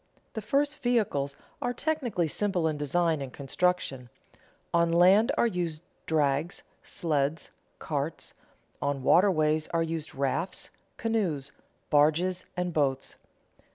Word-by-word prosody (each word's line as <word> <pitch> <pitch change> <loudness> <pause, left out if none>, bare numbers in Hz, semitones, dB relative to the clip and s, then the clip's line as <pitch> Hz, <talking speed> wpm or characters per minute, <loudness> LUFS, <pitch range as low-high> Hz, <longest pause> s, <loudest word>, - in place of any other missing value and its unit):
The 220 - -4
first 285 +7 0
vehicles 205 - 0 0.3
are 245 - 0
technically 245 - -1
simple 180 0 0
in 155 - 0
design 155 +2 +1
and 135 -2 -5
construction; 140 -3 -1 0.6
on 170 0 +3
land 185 +6 +5
are - - +4
used 175 -7 -2 0.2
drags, 150 +1 0 0.2
sleds, 150 -1 -1 0.3
carts; 150 +1 -4 0.5
on 140 -2 -1
waterways 155 -3 +4
are 165 -1 0
used 165 -1 -4
rafts, 140 +7 -2 0.3
canoes, 180 -12 -1 0.4
barges, 165 +5 +3
and 180 -1 -1
boats. 135 -4 0
165 Hz, 115 wpm, -28 LUFS, 145-185 Hz, 0.6 s, land